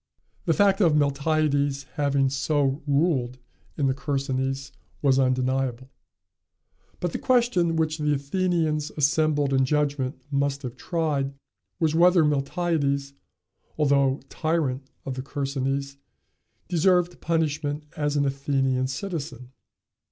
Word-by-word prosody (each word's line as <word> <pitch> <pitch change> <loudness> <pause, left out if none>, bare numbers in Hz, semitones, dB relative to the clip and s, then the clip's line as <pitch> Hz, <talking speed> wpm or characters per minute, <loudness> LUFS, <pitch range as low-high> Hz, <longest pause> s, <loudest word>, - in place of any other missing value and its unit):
The - - +2
fact 200 -1 +3
of 165 -5 +4
Miltiades 145 -1 +1
having 140 -2 +1
so 140 0 0
ruled 140 -4 +1 0.4
in 145 - +1
the 135 - +2
Chersonese 135 0 -2 0.3
was 135 -2 +4
undeniable; 130 0 0 1.1
but 175 - -2
the - - -4
question 235 -10 +2
which 160 -1 0
the 150 -1 +1
Athenians 155 0 0
assembled 145 -1 +2
in 135 0 +3
judgment 145 -1 0
must 140 0 0
have 125 -2 -5
tried, 145 -5 -1 0.4
was 160 -2 +2
whether 175 +1 +5
Miltiades, 140 -1 0 0.6
although 140 -2 +2
tyrant 155 -4 -1 0.2
of 135 - -3
the 130 - -4
Chersonese, 140 0 -3 0.7
deserved 180 0 +2
punishment 150 -2 -1
as 150 -1 -1
an 140 - +2
Athenian 135 -2 0
citizen. 135 - -5
145 Hz, 115 wpm, -25 LUFS, 135-155 Hz, 1.1 s, whether